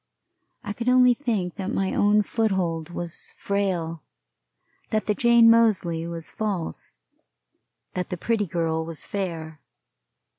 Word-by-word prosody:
I 205 - -4
could 235 +3 -2
only 250 -1 +6
think 215 -9 -2
that 190 -1 -3
my 195 -4 -1
own 210 +1 +4
foothold 185 -8 -1
was 175 -1 -5
frail, 180 -5 -1 0.9
that 215 -1 0
the 210 - +2
Jane 235 0 +5
Moseley 205 -8 +3
was 165 -1 -5
false, 200 -6 -3 1.0
that 180 -1 -3
the 180 - -3
Pretty 210 +2 0
Girl 160 -2 -1
was 165 -1 -4
fair. 165 -6 -5
190 Hz, 125 wpm, -25 LUFS, 165-220 Hz, 1.0 s, only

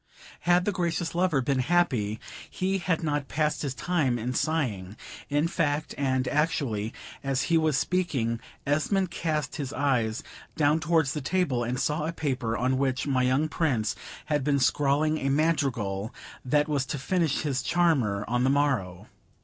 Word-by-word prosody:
Had 175 +1 +3
the 205 - +2
Gracious 170 -2 -1
lover 175 -5 +2
been 135 0 +1
happy, 130 -9 +1 0.3
he 190 +1 -1
had 175 -2 -1
not 145 -2 -1
passed 150 +1 0
his 135 -3 -3
time 150 -9 0
in 120 +2 -3
sighing." 115 - -1 0.3
In 145 +3 +2
fact, 155 -3 -1
and 130 -2 0
actually 140 -9 0 0.3
as 135 -1 0
he - - +6
was 155 -3 +2
speaking, 140 -8 0 0.3
Esmond 170 +6 +1
cast 155 -5 -2
his 140 -3 -4
eyes 125 -6 0 0.3
down 150 +1 +3
towards 160 -4 +2
the 150 - -3
table, 140 -5 0
and 125 +2 -2
saw 150 +2 0
a - - -1
paper 130 -8 -1
on 130 +1 +1
which 130 -2 0
my 135 -3 +1
young 130 +5 +2
Prince 135 -10 0 0.3
had 150 -2 0
been 145 0 +2
scrawling 145 +4 +2
a 135 - -1
madrigal, 130 -9 0 0.3
that 145 +3 +2
was 145 -3 0
to - - -3
finish 165 +2 0
his 135 -4 0
charmer 130 -13 +1
on 125 +1 +1
the 130 - +3
morrow. 135 -11 0
145 Hz, 165 wpm, -27 LUFS, 125-160 Hz, 0.3 s, he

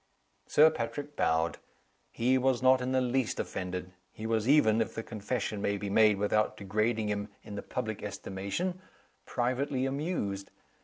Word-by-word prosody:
Sir 155 +2 +6
Patrick 145 +3 -4
bowed. 80 +1 +1 0.5
He 125 +3 +2
was 130 -1 +2
not 130 0 +6
in 125 +1 -1
the 130 0 +3
least 125 -1 0
offended; 90 0 -4 0.2
he 110 - -8
was 110 +1 0
even 115 -7 +5
(if 110 - -2
the 115 - -3
confession 105 -1 -3
may 100 0 0
be 100 0 -4
made 105 -1 +5
without 105 +1 +1
degrading 105 +2 0
him 100 0 -2 0.2
in 105 - -9
the 100 - -4
public - - -4
estimation) 135 - -4 0.5
privately 130 +2 0
amused. 135 - -2
115 Hz, 155 wpm, -30 LUFS, 100-130 Hz, 0.5 s, Sir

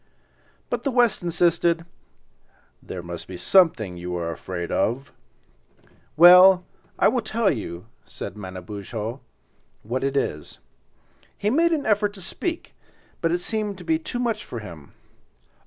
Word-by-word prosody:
But - - -2
the 280 - 0
West 240 -4 +2
insisted—"There 170 - -3
must 85 0 -7
be 95 - -7
something 120 - +3
you 90 0 -5
are 85 -1 -3
afraid 85 +1 -5
of." 135 +5 -1 1.0
"Well, 180 +2 +8 0.3
I - - +4
will 250 - +1
tell 215 0 +1
you," 90 -6 -5 0.2
said - - -8
Manabozho, 105 +5 -6 0.6
"what 125 +5 -3
it 135 0 0
is." 75 - -3 0.8
He 210 +1 0
made 335 +6 +3
an 310 -4 0
effort 205 -1 +2
to 195 - -11
speak, 335 - -4 0.5
but 165 - +1
it 175 +1 0
seemed 210 -1 -3
to - - -10
be 320 -1 +1
too 285 -6 -5
much 230 -3 -1
for 120 - -8
him. 85 -10 -10
165 Hz, 140 wpm, -24 LUFS, -, 1.0 s, Well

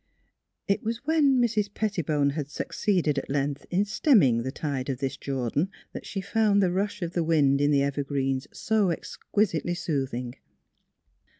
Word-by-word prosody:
" - - -57 0.2
It 200 - +1
was 230 +4 -4
when 290 -4 +3
Mrs. 215 -4 +1
Pettibone 160 -10 0
had 145 -1 -4
succeeded 155 -2 0
at - - -9
length 140 0 -2
in 190 +3 +1
stemming 195 - +4
the 130 +2 -3
tide 140 -2 -3
of 130 - -1
this 135 +1 -3
Jordan 135 +5 -2 0.2
that - - -7
she 195 - -4
found 205 +1 +2
the 185 -3 +3
rush 200 +1 -2
of 170 - -3
the 170 - +1
wind 145 -4 +3
in 145 - +3
the 140 -2 +3
evergreens 135 -1 -1
so 215 -3 +1
exquisitely 175 0 -1
soothing. 135 -7 -3
155 Hz, 165 wpm, -27 LUFS, 140-200 Hz, 0.2 s, stemming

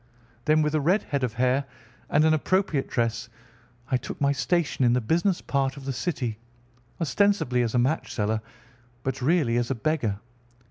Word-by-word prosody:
Then 155 0 +4
with 150 0 0
a 155 - +2
red 180 +9 +2
head 140 -2 -2
of 120 -3 -1
hair, 130 +3 +2 0.4
and 150 +2 +4
an 160 - +5
appropriate 160 -2 +1
dress, 115 -1 -1 0.6
I 130 - +4
took 125 - -7
my 140 -1 +3
station 150 0 0
in 120 -1 +4
the 125 - +3
business 170 - +1
part 135 0 -1
of 135 - -9
the 135 - -2
city, 125 -5 -3 0.6
ostensibly 170 -7 +2
as 120 0 -1
a - - +4
match 130 +6 0
seller 110 0 -1 0.6
but 130 0 -3
really 135 -4 +2
as 120 0 0
a 135 - 0
beggar. 115 -5 -1
135 Hz, 180 wpm, -26 LUFS, 120-155 Hz, 0.6 s, an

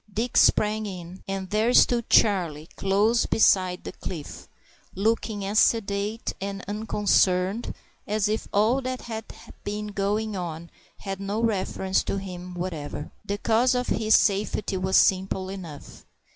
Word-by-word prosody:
Dick 225 +4 -3
sprang 215 0 +3
in, 180 -1 -8
and 195 -1 -4
there 220 +4 +2
stood 235 -2 +4
Charlie 170 -8 +3
close 205 +4 +2
beside 185 -4 +3
the - - -6
cliff, 160 -6 -8 0.5
looking 210 0 0
as 205 +2 +2
sedate 210 0 +1
and, 195 0 -5
unconcerned 205 -1 +1 0.3
as 210 -1 +1
if 215 +1 -2
all 220 +6 +2
that 255 0 -4
had 225 -1 -6 0.4
been 210 +1 -4
going 205 +1 -1
on 170 -2 -6 0.3
had 195 -1 -5
no 200 +2 -3
reference 190 -4 0
to - - -2
him 180 -2 -7
whatever. 160 -5 -5
The 200 - -3
cause 235 +4 +2
of 250 0 -1
his 220 0 +3
safety 200 0 +1
was 190 0 +2
simple 190 0 +2
enough. 175 -7 -9
200 Hz, 140 wpm, -25 LUFS, 185-220 Hz, 0.5 s, stood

